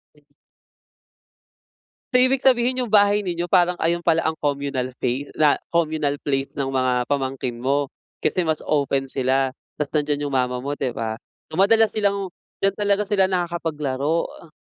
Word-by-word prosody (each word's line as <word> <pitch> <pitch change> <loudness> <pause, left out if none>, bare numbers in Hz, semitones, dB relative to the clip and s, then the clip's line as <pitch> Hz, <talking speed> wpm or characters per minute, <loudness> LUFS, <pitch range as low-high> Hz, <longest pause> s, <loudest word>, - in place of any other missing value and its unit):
Hmm. - - -25 1.9
So, 250 - +6
ibig 255 +1 +3
sabihin 250 -1 +3
'yong 235 - -6
bahay 205 0 +4
ninyo 175 -2 -2
parang 180 -1 +3
ayon 170 +1 0
pala 165 -1 +3
ang 160 - -1
communal 140 -4 -2
fay 130 +3 -2
na 150 -2 +3 0.2
communal 155 -4 0
place 135 -1 -2
ng 135 - 0
mga 130 -2 0
pamangkin 130 -3 -2
mo, 135 +4 0 0.3
kasi 185 - 0
mas 160 -2 0
open 140 -2 +1
sila 130 0 0 0.2
tapos 150 +1 -3
nandiyan 145 -1 0
yung 140 - -3
mama 125 -1 0
mo 140 +3 -3
'di 135 -3 -2
ba? 115 -1 -3 0.3
So, - - -9
madalas 220 +5 +5
silang 200 -2 0 0.3
d'yan 195 0 +1
talaga 205 0 +1
sila 195 -2 +2
nakakapaglaro, 165 -4 -1
uh. 165 - -15
150 Hz, 160 wpm, -22 LUFS, 135-190 Hz, 1.9 s, So